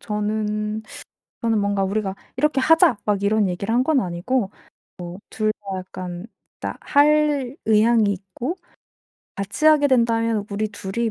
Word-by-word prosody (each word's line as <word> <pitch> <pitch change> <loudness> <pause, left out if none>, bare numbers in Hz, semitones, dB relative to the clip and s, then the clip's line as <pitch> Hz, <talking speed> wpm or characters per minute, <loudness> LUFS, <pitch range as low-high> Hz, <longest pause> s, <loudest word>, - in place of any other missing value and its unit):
저는 210 0 -2 0.6
저는 225 -2 +2
뭔가 200 -1 0
우리가 195 0 -1 0.2
"이렇게 300 -3 +2
하자." 320 -5 +5
막 205 -1 0
이런 210 0 +2
얘기를 200 +5 -3
한 250 - +4
건 305 -3 +3
아니고 190 +4 -1 0.6
뭐 175 +2 -8
둘 215 -1 0
다 195 -3 -6
약간 185 +1 -7 0.3
다 - - -5
할 290 -2 +2
의향이 220 +1 +4
있고 200 - -5 0.8
같이 200 +9 -4
하게 300 -2 +6
된다면 230 -4 +2
우리 210 +1 -1
둘이 210 +3 -3
215 Hz, 260 characters per minute, -22 LUFS, 200-250 Hz, 0.8 s, 하게